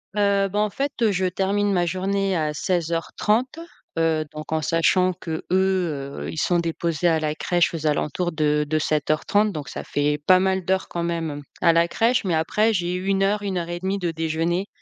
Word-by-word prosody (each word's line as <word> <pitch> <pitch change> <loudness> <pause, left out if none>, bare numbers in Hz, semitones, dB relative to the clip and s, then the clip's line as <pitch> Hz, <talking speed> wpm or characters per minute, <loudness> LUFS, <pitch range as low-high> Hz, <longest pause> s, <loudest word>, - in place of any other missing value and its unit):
Heu, 200 -1 +2
ben, 205 +2 -1
en 210 - +2
fait, 245 -2 0
je 190 -1 0
termine 195 +2 0
ma 175 -2 +2
journée 195 +2 0
à 155 -1 -1
16:30, 180 - -1 0.4
heu, 160 -1 +1
donc 155 0 -8
en 160 0 +1
sachant 175 +4 +2
qu'eux, 165 -3 -5
heu, 180 -7 0
ils 160 - -8
sont 175 +2 +2
déposés 170 0 -1
à 165 -2 +3
la 155 -1 -1
crèche 175 +2 +1
aux 155 -2 -2
alentours 150 +4 0
de 150 -1 +1
de 155 +1 0
07:30 155 +8 +1
donc 150 -6 -6
ça - - -6
fait 145 +1 0
pas 185 -1 +7
mal 190 -1 0
d'heures 190 0 0
quand 170 -1 -3
même 165 -4 -3 0.2
à 170 -2 +5
la 170 +1 +3
crèche, 230 +4 +1
mais 175 -3 +1
après 210 +8 +2
j'ai 180 -2 -1
1 195 +1 0
heure, 205 +2 +1
1 195 -2 -2
heure 170 -1 -3
et 175 0 -4
1/2 190 +2 -1
de 175 -3 -1
déjeuner, 165 +3 -1
175 Hz, 200 wpm, -23 LUFS, 160-195 Hz, 0.4 s, pas